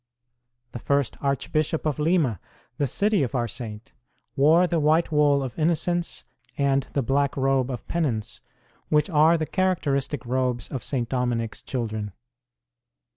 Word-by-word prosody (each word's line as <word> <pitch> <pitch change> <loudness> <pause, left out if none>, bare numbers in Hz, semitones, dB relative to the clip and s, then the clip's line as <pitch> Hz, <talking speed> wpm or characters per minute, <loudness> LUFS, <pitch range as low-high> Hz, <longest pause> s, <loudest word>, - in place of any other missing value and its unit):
The 120 - -6
first 140 +1 0
Archbishop 155 +3 -1
of 155 -1 -1
Lima, 150 - +1 0.4
the 145 - +2
city 205 - +1
of 135 -1 -2
our 120 -2 0
saint, 110 -1 -7 0.4
wore 160 +6 +5
the 170 -2 0
white 155 +3 +2
wool 145 -2 +3
of 130 +3 -6
innocence 170 +2 0 0.3
and 140 -1 +1
the 140 - 0
black 140 +3 0
robe 135 -1 +1
of 125 -3 -6
penance, 130 -11 -2 0.5
which 150 +4 +2
are 160 +2 +5
the 160 - -1
characteristic 145 -8 -1
robes 125 -1 -1
of 130 -5 -5
St. 125 -4 -1
Dominic 120 -3 -1
s - - -9
children. 110 -5 -4
140 Hz, 145 wpm, -25 LUFS, 125-155 Hz, 0.5 s, wore